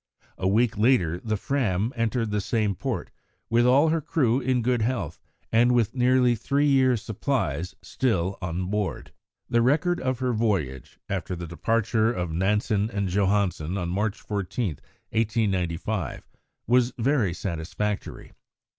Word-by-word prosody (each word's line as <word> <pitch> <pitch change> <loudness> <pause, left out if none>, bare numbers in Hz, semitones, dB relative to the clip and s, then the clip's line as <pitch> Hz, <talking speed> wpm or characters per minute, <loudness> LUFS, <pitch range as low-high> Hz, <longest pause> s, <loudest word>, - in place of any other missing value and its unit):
A 95 - 0
week 110 +2 +2
later 95 -8 +3
the 110 +1 -2
Fram 110 -3 0
entered 115 -1 -1
the 105 0 0
same 105 -1 0
port, 90 - -4 0.4
with 120 +1 +4
all 140 +5 +5
her 165 0 +1
crew 130 -5 +1
in 125 -2 0
good 125 -1 +1
health, 110 - -2 0.3
and 120 +2 +4
with 120 -4 +2
nearly 125 -1 +3
three 140 +6 0
years' 130 -5 +3
supplies 95 - -2
still 95 -7 0
on 90 +1 -2
board. 105 -2 -2 0.4
The 120 - +2
record 160 +8 +2
of 130 -1 -1
her 125 -1 -1
voyage, 95 - -1
after 95 -2 -3
the 85 0 -6
departure 110 +6 +1
of 90 -7 -3
Nansen 105 +4 +1
and 100 -3 -2
Johansen 95 -3 0
on 90 -2 -2
March 105 +3 -1
14, 100 - -3 0.3
1895, 100 - -1 0.4
was 125 0 +3
very 120 -5 +2
satisfactory. 95 +4 -4
110 Hz, 140 wpm, -26 LUFS, 95-125 Hz, 0.4 s, all